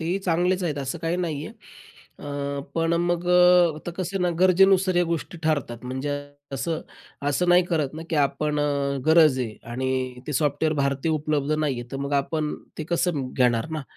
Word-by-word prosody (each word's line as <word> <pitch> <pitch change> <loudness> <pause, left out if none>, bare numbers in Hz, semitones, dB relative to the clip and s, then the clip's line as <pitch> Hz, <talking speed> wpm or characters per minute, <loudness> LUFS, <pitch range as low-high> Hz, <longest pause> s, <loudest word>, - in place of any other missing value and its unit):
तेही 175 +4 -1
चांगलेच 180 0 +1
आहेत 150 -4 -2
असं 140 +4 -4
काही 165 +2 0
नाही 155 -5 -3
आहे. 225 - -10 0.6
अ, 140 -1 -4
पण 165 0 +1
अ, - - +2
मग 175 0 0
अ, 180 -2 +6
आता 175 - -6
कसं 185 +2 -3
आहे 180 - 0
ना 175 - +2
गरजेनुसार 185 0 +5
या 175 - +4
गोष्टी 170 +1 -4
ठरतात, 140 -7 -1
म्हणजे 135 +3 -3 0.3
कसं, 160 +4 -2 0.5
असं 175 +5 0
नाही 175 +1 +6
करत 160 -5 0
ना 160 - -6
की 160 - 0
आपण 150 +1 +1
अ, 140 -1 0
गरज 160 -4 +6
आहे 115 -4 -3 0.2
आणि 130 0 -2
ते 150 - -3
सॉफ्टवेअर 150 +2 +1
भारतीय 140 +3 0
उपलब्ध 150 -1 0
नाही 150 -5 0
आहे, - - -7
तर - - -2
मग 140 +1 -4
आपण 150 +2 -1 0.2
ते 155 - -3
कसं 170 +1 0
म 130 -1 -4
घेणार 120 +1 +2
ना 155 -2 -3
155 Hz, 200 wpm, -24 LUFS, 140-175 Hz, 0.6 s, अ